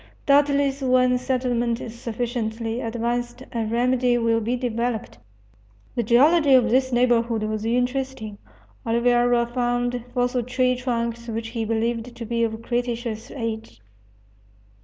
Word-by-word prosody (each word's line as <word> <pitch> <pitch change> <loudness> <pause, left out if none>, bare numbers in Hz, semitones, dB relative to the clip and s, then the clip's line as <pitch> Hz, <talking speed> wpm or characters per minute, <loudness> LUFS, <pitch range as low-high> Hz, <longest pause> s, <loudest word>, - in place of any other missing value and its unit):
Doubtless 280 -1 +3
when 255 -1 +3
settlement 245 -2 0
is 225 - -7
sufficiently 230 0 -3
advanced 240 +2 -3
a 230 -2 -2
remedy 245 +2 +2
will 230 -1 +1
be 235 +3 -1
developed. 240 -2 -3 0.7
The 245 - 0
geology 275 +6 +5
of 240 -3 +4
this 260 +1 +2
neighborhood 235 -2 +2
was 215 0 -2
interesting 250 -2 -2 0.4
Oliveira 240 +1 +3
found 245 0 -1
fossil 245 0 0
tree 255 +1 +1
trunks 235 -2 -3
which 225 0 -4
he 230 -1 -3
believed 230 +2 -2
to 235 -1 -6
be 235 +1 0
of 225 0 -2
cretaceous 240 -2 -3
age. 225 - -5
240 Hz, 125 wpm, -23 LUFS, 230-250 Hz, 0.7 s, geology